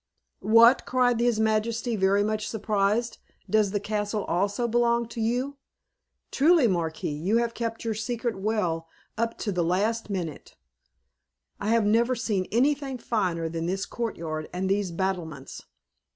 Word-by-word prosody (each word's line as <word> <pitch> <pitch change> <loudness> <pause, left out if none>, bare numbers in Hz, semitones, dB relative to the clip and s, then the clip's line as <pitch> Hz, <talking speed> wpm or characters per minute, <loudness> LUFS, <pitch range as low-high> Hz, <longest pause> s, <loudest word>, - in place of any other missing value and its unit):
"What!" 235 +3 +7
cried 250 -2 +2
his 240 -2 +2
majesty, 220 +2 0
very 200 0 +3
much 215 0 -2
surprised, 215 +1 0 0.3
"does 215 -2 +3
the 205 +1 -1
castle 210 0 -2
also 200 +7 0
belong 235 0 +2
to 230 - -5
you? 250 +5 -1 0.7
Truly, 310 -1 +4
Marquis, 165 -5 -2
you 180 +10 0
have 235 0 0
kept 230 -1 -4
your 225 - 0
secret 230 +2 -3
well 180 -6 -1 0.3
up 230 +1 -2
to 210 - -2
the 180 -2 0
last 210 +7 0
minute. 175 -7 -5 1.0
I 205 - -4
have 225 -1 +3
never 235 +4 +3
seen 205 -5 -1
anything 270 +3 +1
finer 185 -9 -1
than 165 0 -3
this 190 +2 -1
courtyard 165 -9 -4
and 185 +1 -2
these 195 0 0
battlements. 170 -6 -4
215 Hz, 145 wpm, -26 LUFS, 190-235 Hz, 1.0 s, What